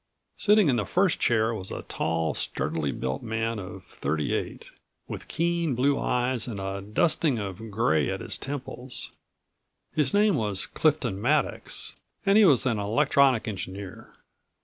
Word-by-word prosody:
Sitting 210 -3 +4
in 130 -4 +3
the 105 - +1
first 185 -2 +2
chair 110 -1 +2
was 95 -4 -6
a - - -6
tall, 80 0 -1
sturdily 75 -2 -2
built 65 0 -3
man 115 0 -2
of 90 -2 -8
thirty 75 +1 -2
eight, - - -3 0.4
with - - -7
keen 170 -4 0
blue 140 +3 +2
eyes 125 -1 0
and 110 -5 -5
a 95 0 -4
dusting 130 +6 +2
of 105 +1 -5
gray 100 - +1
at - - -2
his - - -2
temples. 130 -2 -4 0.8
His 150 -4 +2
name 205 -1 +3
was 105 -4 0
Clifton 125 -10 0
Maddox 150 +7 -1 0.3
and 195 0 +4
he 215 -1 +7
was 140 -9 +5
an 115 -5 +1
electronic 130 +2 +3
engineer. 95 -2 -6
115 Hz, 150 wpm, -27 LUFS, 100-145 Hz, 0.8 s, he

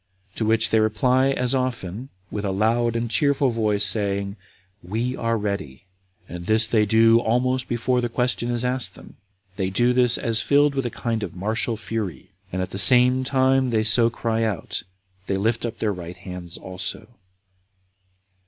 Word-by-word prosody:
To 110 - -2
which 110 0 +2
they 110 - +4
reply 125 +5 +2
as 125 -2 -1
often, 125 -3 -3 0.2
with 105 - -4
a 100 - -1
loud 115 +4 +1
and 115 0 -1
cheerful 140 +3 +2
voice, 105 -3 +1
saying, 100 0 -1 0.5
"We 115 +8 -3
are 115 0 -1
ready." 100 -10 -4 0.4
And 85 0 -8
this 110 +1 +3
they 110 -2 +2
do 115 +2 +5
almost 125 +2 0
before 125 +1 0
the 120 - -2
question 125 0 -1
is 120 0 -1
asked 125 +1 0
them: - - -15 0.4
they 95 -2 -1
do 120 +6 +2
this 125 -1 +3
as 115 -1 -1
filled 145 0 +3
with 135 -3 -1
a - - -3
kind 115 -1 -3
of 95 -5 -6
martial 110 +4 -1
fury, 100 - -5 0.2
and 95 0 -2
at 95 - -7
the 95 - -5
same 125 +6 +5
time 130 0 +2
that 115 - 0
they 110 - +2
so 115 +2 +6
cry 115 -1 -2
out, 110 -5 -3 0.5
they 95 - -1
lift 115 +4 -1
up 115 - -7
their 105 -2 -1
right 90 -1 -8
hands 90 -1 -8
also. 95 +3 -5
115 Hz, 180 wpm, -23 LUFS, 100-125 Hz, 0.5 s, so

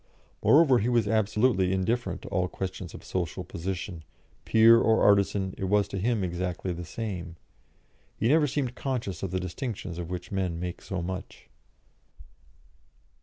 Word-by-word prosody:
Moreover, 140 -5 +6
he 115 - 0
was 120 -4 +2
absolutely 105 -2 +2
indifferent 110 +6 -1
to - - -8
all 90 -1 0
questions 95 -1 -6
of - - -11
social 90 -4 -3
position; 90 -1 -5 0.4
peer 115 +1 +7
or 110 0 +3
artisan, 100 -1 +3
it 95 - -1
was 100 +1 +2
to 100 - -3
him 110 0 0
exactly 90 0 -3
the 85 +1 -6
same; 90 -3 -5 0.8
he 110 - +1
never 150 +3 +4
seemed 135 -2 -2
conscious 125 - -3
of 95 - -2
the 95 +1 -1
distinctions 90 -1 -5
of 85 -1 -5
which 90 -1 -6
men 95 -4 -1
make 90 0 -5
so 95 -3 -4
much. 95 +2 -7
95 Hz, 155 wpm, -28 LUFS, 90-115 Hz, 0.8 s, peer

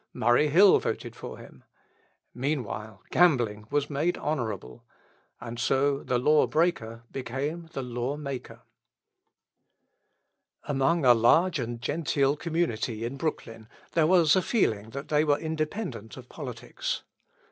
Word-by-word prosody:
Murray 120 +5 +3
Hill 185 +7 +6
voted - - -4
for - - -8
him. 65 - -14 0.7
Meanwhile 120 -7 -4
gambling 120 -12 +3
was 145 0 0
made 155 +5 -1
honourable. 110 - -4 0.6
And 120 0 -7
so 135 +3 +1
the 125 - 0
law 150 +5 +4
breaker 115 -9 0
became 140 +6 -4
the 135 - -3
law 125 +3 -3
maker. 140 -4 -7 2.0
Among 145 +2 +1
a 125 - +8
large 155 +9 +3
and 120 -1 -4
genteel 140 +1 0
community 140 -9 -2
in 120 +4 -4
Brooklyn 115 -7 -4 0.2
there 160 -2 +3
was 170 -3 +5
a 185 - +3
feeling 110 - 0
that 140 +4 -7
they 150 0 +3
were 145 -2 +2
independent 155 - -4
of - - -11
politics. - - -5
140 Hz, 125 wpm, -27 LUFS, 120-155 Hz, 2.0 s, a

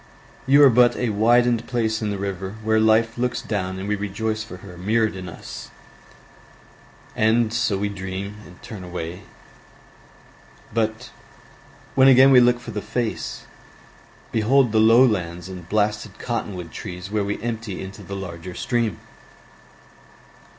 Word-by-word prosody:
You 140 +2 +7
are 135 - +8
but 120 +1 +5
a 125 - -1
widened 120 +2 +3
place 110 -2 -1
in 105 - -1
the 100 - -2
river 95 0 -4
Where 110 0 +2
Life 110 +1 +3
looks 125 -1 0
down 95 -4 -3
and 95 +1 -5
we 105 - +1
rejoice 110 +2 -3
for 90 -5 -10
her 90 -2 -10
Mirrored 110 +4 0
in 90 -1 -7
us, - - -9 1.5
and 110 +1 +2
so 110 -4 +1
we 100 +1 -1
dream 100 +1 -6
And 90 - -16
turn 110 -5 -8
away, 90 0 -6 1.5
but 110 +2 -2 0.8
when 135 0 +5
again 135 +1 +7
We 130 - +8
look 120 0 +4
for - - -8
the 105 -1 -4
face, 120 0 -3 0.9
behold 120 +3 +3
the 110 - +3
low 115 +4 +7
lands 90 -6 -2
And 90 -3 -9
blasted 105 -1 -1
cotton 115 -4 -3
wood 85 -2 -7
trees 90 +2 -7
where 105 -1 0
we 100 +1 -3
empty 115 -4 -4
Into 95 +2 -8
the 100 +1 -7
larger 90 -2 -7
stream! 115 -7 -1
110 Hz, 150 wpm, -23 LUFS, 95-115 Hz, 1.5 s, are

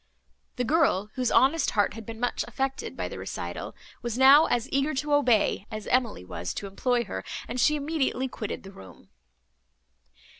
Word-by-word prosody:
The 250 - -1
girl, 235 - +2
whose 255 -2 0
honest 275 +6 +3
heart 205 - +3
had 225 0 -10
been 225 -1 -7
much 245 0 -1
affected 270 0 -3
by - - -2
the - - -7
recital, - - -6 0.3
was 240 -1 -3
now 275 +4 +8
as 240 +1 0
eager 275 +2 +1
to 295 +2 -1
obey, 240 -7 +2
as 215 -1 -6
Emily 240 - 0
was 90 -1 -5
to - - -4
employ 240 +5 0
her, 95 - -6 0.2
and 245 +2 -4
she 300 +4 +4
immediately 285 -3 -1
quitted 220 -4 -6
the 195 - -10
room. 95 - -14
245 Hz, 175 wpm, -27 LUFS, 215-275 Hz, 0.3 s, now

